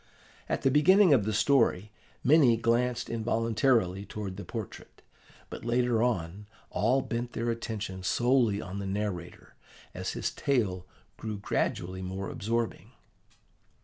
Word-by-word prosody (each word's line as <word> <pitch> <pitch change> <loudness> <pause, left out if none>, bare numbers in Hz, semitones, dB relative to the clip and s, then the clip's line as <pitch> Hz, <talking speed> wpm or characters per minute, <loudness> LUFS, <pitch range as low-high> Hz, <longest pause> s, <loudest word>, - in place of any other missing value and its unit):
At - - -1
the 135 - +4
beginning 180 +5 +6
of 110 -7 +3
the 110 - 0
story, 110 -3 +2 0.3
many 135 -4 +5
glanced 120 +1 +1
involuntarily 115 -3 +1
towards 100 -2 -6
the 100 - -7
portrait; 110 -4 -8 0.5
but - - -7
later 120 -1 +1
on, 100 -4 -1 0.2
all 125 +6 +2
bent 120 +1 -4
their 115 +1 -1
attention 110 -4 -5
solely 120 +1 +2
on 95 -1 -6
the 100 - -4
narrator, 95 -3 -4 0.4
as - - -4
his - - -2
tale 95 -10 -1 0.3
grew 110 -2 -5
gradually 95 -2 -2
more 95 +1 -5
absorbing. 115 +2 -3
110 Hz, 130 wpm, -29 LUFS, 100-120 Hz, 0.5 s, beginning